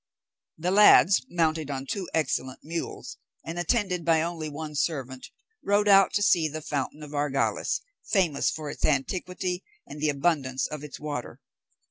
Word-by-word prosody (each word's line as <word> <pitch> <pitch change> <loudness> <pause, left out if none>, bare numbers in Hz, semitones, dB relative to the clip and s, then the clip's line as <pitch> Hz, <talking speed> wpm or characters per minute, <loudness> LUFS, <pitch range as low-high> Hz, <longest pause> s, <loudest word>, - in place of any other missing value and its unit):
The 175 +3 -1
lads, 200 -1 +7
mounted 160 -3 0
on 135 -1 -4
two 185 +5 -4
excellent 130 -4 -2
mules, 165 +2 -6 0.3
and 165 +2 -5
attended 180 -1 0
by 160 -1 +3
only 165 -2 -4
one 150 +1 -6
servant, 135 -4 -2 0.4
rode 205 +1 +2
out 195 -1 +6
to 205 - +1
see 170 -5 +4
the 155 +1 -5
fountain 145 +1 -3
of 150 0 -10
Argales, 145 -1 0 0.3
famous 175 -9 +2
for 155 -2 -5
its - - -9
antiquity 180 +5 -1 0.2
and 150 - -10
the 155 - +2
abundance 140 -3 0
of 150 -1 -6
its 150 - -8
water. 145 -4 -5
155 Hz, 155 wpm, -27 LUFS, 145-180 Hz, 0.4 s, lads